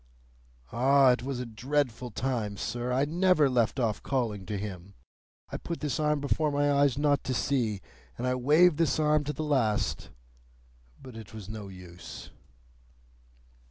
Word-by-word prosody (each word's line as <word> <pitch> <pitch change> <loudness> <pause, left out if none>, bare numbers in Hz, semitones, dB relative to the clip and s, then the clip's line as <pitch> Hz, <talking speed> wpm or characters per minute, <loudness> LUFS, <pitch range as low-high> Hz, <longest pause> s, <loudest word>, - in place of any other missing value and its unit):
"Ah! 135 +2 +5
it 125 - 0
was 130 0 -4
a 125 - -3
dreadful 125 +1 -2
time, 115 -3 -2
sir. 120 +4 -3
I 130 +3 +2
never 175 -1 +3
left 125 0 +1
off 110 -4 0
calling 110 -8 -2
to 105 - -3
him. 100 -1 -7 0.6
I - - -3
put 170 - -5
this 145 -4 -2
arm 150 -1 +1
before 150 +2 0
my 145 0 +2
eyes 140 -2 +3
not 145 -1 +2
to 130 - -1
see, 115 -9 0 0.4
and 125 - -3
I 125 - +1
waved 150 +6 +4
this 165 - +2
arm 150 -1 +3
to 150 - -2
the 155 - -4
last; 130 -8 0 0.9
but 130 -3 -12
it 110 -1 -10
was 105 -4 -8
no 110 -2 -6
use." 90 -2 -11
130 Hz, 160 wpm, -28 LUFS, 110-145 Hz, 0.9 s, Ah